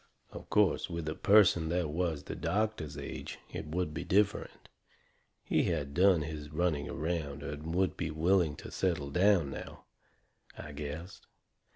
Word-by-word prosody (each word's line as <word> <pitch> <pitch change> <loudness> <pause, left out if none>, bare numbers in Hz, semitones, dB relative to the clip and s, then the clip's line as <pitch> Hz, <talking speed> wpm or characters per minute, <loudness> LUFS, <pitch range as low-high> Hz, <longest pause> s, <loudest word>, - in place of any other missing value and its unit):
Of - - -10
course, 105 -3 +3
with 85 -2 -4
a 75 - -1
person 95 -5 +5
that 85 -2 0
was 80 -3 -1
the - - -6
doctor's 100 -9 -1
age 70 - -6 0.2
it - - -5
would 80 0 -2
be 80 - -4
different. 105 +2 0 0.8
He - - +2
had 75 -5 -1
done 90 -2 +5
his 75 -1 -6
running 75 -2 0
around 75 -3 -3
and 75 +3 -5
would 95 0 +1
be 85 - -2
willing 80 0 +2
to - - -9
settle 80 -7 -1
down 90 -3 +3
now, - - -8 0.7
I 75 - -7
guessed. 75 +6 -7
80 Hz, 155 wpm, -32 LUFS, 75-90 Hz, 0.8 s, person